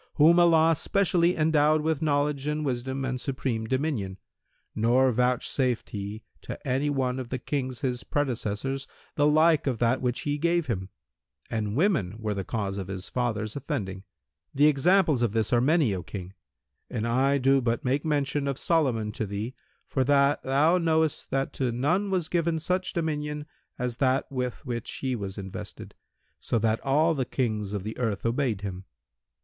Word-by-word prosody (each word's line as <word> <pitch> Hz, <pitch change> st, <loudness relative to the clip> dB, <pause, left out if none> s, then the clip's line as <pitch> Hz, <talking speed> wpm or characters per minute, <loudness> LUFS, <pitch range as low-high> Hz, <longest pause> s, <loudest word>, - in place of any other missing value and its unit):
whom 165 Hz, +3 st, +6 dB
Allah 165 Hz, -1 st, +5 dB
specially 180 Hz, 0 st, +2 dB
endowed 155 Hz, -1 st, +3 dB
with 160 Hz, -1 st, 0 dB
knowledge 145 Hz, -2 st, 0 dB
and 150 Hz, 0 st, -1 dB
wisdom 130 Hz, +1 st, -2 dB
and 125 Hz, -1 st, -3 dB
supreme 125 Hz, -4 st, -2 dB
dominion, 130 Hz, -8 st, -1 dB, 0.6 s
nor 125 Hz, +4 st, +3 dB
vouchsafed 125 Hz, +1 st, 0 dB
He 105 Hz, +1 st, -5 dB, 0.2 s
to -, -, -6 dB
any 135 Hz, +3 st, +1 dB
one 130 Hz, -2 st, 0 dB
of 125 Hz, -2 st, -6 dB
the 130 Hz, -, -2 dB
Kings 130 Hz, -1 st, -3 dB
his 125 Hz, -3 st, -2 dB
predecessors 135 Hz, -1 st, -2 dB, 0.3 s
the 145 Hz, -, +3 dB
like 155 Hz, 0 st, +4 dB
of 130 Hz, -4 st, 0 dB
that 120 Hz, +3 st, +1 dB
which 125 Hz, -1 st, -1 dB
He 145 Hz, 0 st, -2 dB
gave 170 Hz, +1 st, +2 dB
him; 95 Hz, -8 st, -3 dB, 0.6 s
and 105 Hz, -2 st, -2 dB
women 145 Hz, -, +1 dB
were 110 Hz, -2 st, -2 dB
the 100 Hz, -1 st, -3 dB
cause 100 Hz, -2 st, -3 dB
of 95 Hz, -, -5 dB
his 95 Hz, -1 st, -5 dB
father's 110 Hz, -4 st, -2 dB
offending. 120 Hz, -, -4 dB, 0.5 s
The 145 Hz, +2 st, +5 dB
examples 155 Hz, -1 st, +4 dB
of 115 Hz, -4 st, +1 dB
this 110 Hz, +1 st, 0 dB
are 120 Hz, -, +4 dB
many, 145 Hz, -, +3 dB
O 90 Hz, -, -3 dB
King, 95 Hz, 0 st, -8 dB, 0.6 s
and 115 Hz, -1 st, -2 dB
I 135 Hz, +4 st, +2 dB
do 135 Hz, 0 st, +3 dB
but 120 Hz, 0 st, -1 dB
make 135 Hz, +3 st, +1 dB
mention 145 Hz, -2 st, 0 dB
of 135 Hz, -1 st, -1 dB
Solomon 130 Hz, -12 st, +1 dB
to 110 Hz, 0 st, -3 dB
thee 105 Hz, +5 st, -4 dB, 0.3 s
for 130 Hz, -, 0 dB
that 140 Hz, +1 st, +3 dB
thou 150 Hz, +7 st, +3 dB
knowest 160 Hz, -2 st, +1 dB
that 135 Hz, 0 st, -1 dB
to 130 Hz, -3 st, -1 dB
none 165 Hz, -, +1 dB
was 185 Hz, -4 st, 0 dB
given 170 Hz, -1 st, 0 dB
such 185 Hz, +3 st, -1 dB
dominion 150 Hz, -2 st, -2 dB, 0.3 s
as 125 Hz, -1 st, -3 dB
that 130 Hz, 0 st, +2 dB
with 125 Hz, +1 st, -3 dB
which 120 Hz, -3 st, -4 dB
he 130 Hz, -2 st, -2 dB
was 100 Hz, -3 st, -5 dB
invested, 95 Hz, -2 st, -7 dB, 0.5 s
so -, -, -1 dB
that 110 Hz, 0 st, +1 dB
all 155 Hz, +4 st, +3 dB
the 135 Hz, -4 st, 0 dB
Kings 110 Hz, -6 st, -2 dB
of 100 Hz, -3 st, -3 dB
the 110 Hz, +2 st, -5 dB
earth 110 Hz, -5 st, -1 dB
obeyed 115 Hz, -3 st, 0 dB
him. 95 Hz, -2 st, -6 dB
130 Hz, 175 wpm, -27 LUFS, 115-150 Hz, 0.6 s, whom